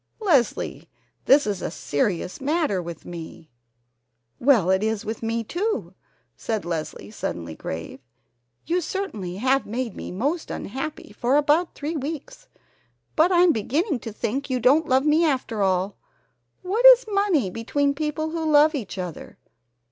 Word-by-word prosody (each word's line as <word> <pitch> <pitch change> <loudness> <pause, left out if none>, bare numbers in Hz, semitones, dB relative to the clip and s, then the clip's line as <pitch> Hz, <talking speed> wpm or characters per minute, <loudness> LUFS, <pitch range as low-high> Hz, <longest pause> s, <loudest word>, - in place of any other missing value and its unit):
"Leslie, 320 - +1 0.4
this 285 +2 +6
is 200 -3 -2
a - - -2
serious 175 - -2
matter 290 - 0
with 170 -2 -8
me 165 -2 -9 0.4
" 120 0 -50
"Well, 200 -10 +5
it 190 +1 +2
is 220 0 -1
with 220 +1 -4
me, 230 0 -1
too," 415 - -2 0.4
said 215 -6 -3
Leslie, 165 +4 -5
suddenly 85 - -5
grave. 80 +10 -6 0.7
"You 355 +2 +1
certainly 305 - -4
have 260 +6 +1
made 235 0 -3
me - - -7
most 285 - -2
unhappy 305 +8 -5
for 250 +3 +1
about 300 +4 +2
three 305 +3 -4
weeks. 310 - -6 0.7
But 325 +4 +4
I'm 355 -1 +5
beginning 285 - 0
to 225 - -7
think 260 +7 -3
you 255 -1 0
don't 285 +7 +3
love 260 +2 +3
me 310 +2 +4
after 255 -8 0
all. 190 +1 +1 0.7
What 405 +6 -1
is - - +9
money 395 - +1
between 280 +7 0
people 310 +1 -2
who 330 0 -3
love 305 +1 +6
each 235 -9 -5
other? 180 -3 -7
260 Hz, 150 wpm, -24 LUFS, 195-315 Hz, 0.7 s, is